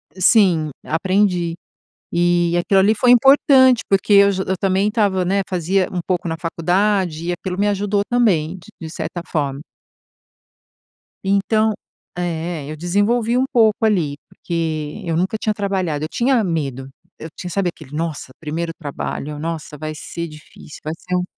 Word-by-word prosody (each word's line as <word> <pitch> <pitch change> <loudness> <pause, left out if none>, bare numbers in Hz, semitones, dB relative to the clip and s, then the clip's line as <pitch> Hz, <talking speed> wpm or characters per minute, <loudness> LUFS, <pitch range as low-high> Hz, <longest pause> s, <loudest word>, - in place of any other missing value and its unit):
E 185 - -10
sim. 180 -7 +4
Aprendi. 180 0 +1 0.6
E 175 0 +2
aquilo 195 +2 +3
ali 210 +3 +4
foi 245 +3 +3
importante 260 0 +6
porque 195 +1 +2
eu 200 0 +7
j 190 - -2
eu 190 - 0
também 195 +2 +1
estava, 200 -4 +1
né, 195 +2 +1
fazia 185 +1 0
um 180 - -2
pouco 180 -2 -1
na 160 - -2
faculdade 175 0 0
e 175 - 0
aquilo 180 +1 -5
me 205 - +2
ajudou 205 0 0
também, 190 -9 +2
d 175 - -16
de 160 - -6
certa 170 +2 -5
forma. 140 -3 -2 1.6
Então 205 +3 +2 0.5
é 180 - -1 0.5
é. 150 - -6
Eu - - -5
desenvolvi 205 +8 +1
um 260 - +2
pouco 225 0 +3
ali. 170 -10 +1
Porque 165 -1 -4
eu 165 -1 -1
nunca 185 +6 0
tinha 215 0 -1
trabalhado 190 -7 -2
eu 155 - -6
tinha 245 -1 +2
medo. 140 -7 -3 0.3
Eu 160 - -7
tinha, 180 - -6
sabe, 190 0 0
aquele: 155 -5 -12
"Nossa, 160 -4 -4
primeiro 165 +2 -4
trabalho. 150 -1 -5
Nossa, 160 -1 -5
vai 155 +1 -5
ser 170 +3 -6
difícil. 150 -1 -13
Vai 155 - -3
ser 180 - -4
um" 180 - +1
180 Hz, 165 wpm, -20 LUFS, 160-205 Hz, 1.6 s, eu